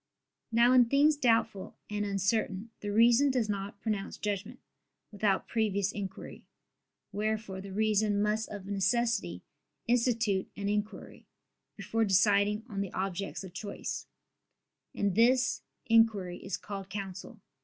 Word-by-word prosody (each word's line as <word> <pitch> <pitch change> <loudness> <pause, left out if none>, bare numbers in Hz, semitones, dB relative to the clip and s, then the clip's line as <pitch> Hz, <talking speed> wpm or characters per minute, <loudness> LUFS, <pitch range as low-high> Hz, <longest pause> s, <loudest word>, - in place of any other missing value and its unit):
Now 235 +2 +5
in 250 -1 +7
things 285 +5 +4
doubtful 225 -7 +1
and 210 0 -2
uncertain 200 +1 -1
the 205 - -5
reason 235 +6 +5
does 250 -4 +1
not 200 -1 -4
pronounce 210 -3 -3
judgment, 205 +4 -3 0.5
without 205 -2 0
previous 205 -3 0
inquiry: 195 -2 -7 0.7
wherefore 210 -2 -2
the 195 0 -9
reason 210 0 +1
must 210 +2 0
of 205 -2 -7
necessity 200 - 0 0.4
institute 230 -5 +1
an 200 0 -2
inquiry 210 +1 -4 0.5
before 225 0 -1
deciding 205 +1 +3
on 200 -4 -4
the 195 - -4
objects 195 +1 -3
of 185 -2 -10
choice; 200 +2 -5 0.9
and 200 -2 0
this 245 +4 +3 0.2
inquiry 220 -6 +2
is 195 -1 -3
called 195 -2 -7
counsel. 195 +2 -7
210 Hz, 125 wpm, -30 LUFS, 195-225 Hz, 0.9 s, in